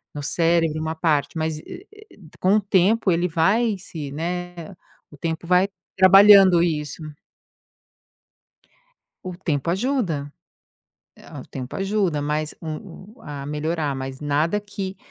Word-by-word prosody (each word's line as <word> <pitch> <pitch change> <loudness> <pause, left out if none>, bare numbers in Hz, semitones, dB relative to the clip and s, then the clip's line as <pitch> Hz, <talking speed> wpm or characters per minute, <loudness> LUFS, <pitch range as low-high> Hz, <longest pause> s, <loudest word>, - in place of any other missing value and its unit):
no 145 - -5
cérebro 165 0 +1
uma 160 0 -3
parte, 160 -1 0
mas 160 -1 -2
e 370 - -11 0.3
e - - -18 0.2
com 190 +3 +3
o - - +4
tempo 195 +1 +2
ele 175 +1 +1
vai 200 +7 +1
se 155 -6 -8
né, 175 +3 -5 0.4
o - - -13
tempo 160 +2 -4
vai 180 +2 +3 0.3
trabalhando 190 -1 +7
isso. 155 -2 -3 2.2
O 185 - -5
tempo 160 -4 -2
ajuda. 185 - -1 0.8
É, - - -16
o - - -8
tempo 130 -1 -7
ajuda, 195 -5 0
mas 150 +1 -2
o 165 +3 -7 0.2
o - - -20
a 145 -2 -7
melhorar, 150 0 -2
mas 130 0 -6
nada 150 +7 0
que 200 -2 -6
170 Hz, 135 wpm, -22 LUFS, 150-190 Hz, 2.2 s, trabalhando